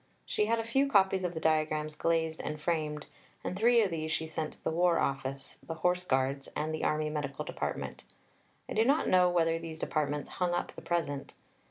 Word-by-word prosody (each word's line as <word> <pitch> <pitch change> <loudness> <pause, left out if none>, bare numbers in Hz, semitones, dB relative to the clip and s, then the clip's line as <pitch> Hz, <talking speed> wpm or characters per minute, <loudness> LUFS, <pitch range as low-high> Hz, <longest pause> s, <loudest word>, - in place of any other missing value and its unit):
She 210 - 0
had 230 +1 +2
a 225 - -1
few 270 +5 +2
copies 190 -4 +4
of 180 -1 -2
the - - -2
diagrams 155 -1 +1
glazed 160 0 0
and 150 - -4
framed, 150 -2 -1 0.4
and - - -3
three 230 +3 +5
of 195 - -1
these 155 -1 -2
she 160 - 0
sent 160 -1 -4
to - - -23
the - - 0
War 175 +1 +3
Office, 135 0 -2
the 165 - -6
Horse 180 +2 +1
Guards, 135 -2 0
and 155 +1 -1
the 155 - -3
Army 155 0 +1
Medical 140 -3 -3
Department. - - -4 0.6
I - - -5
do 220 - +4
not 280 +6 +3
know 180 -1 +5
whether 165 -2 +2
these 165 -1 -7
Departments 150 -2 -1
hung 175 -1 +2
up - - -2
the - - -8
present. 150 -5 -2
160 Hz, 205 wpm, -31 LUFS, 150-180 Hz, 0.6 s, three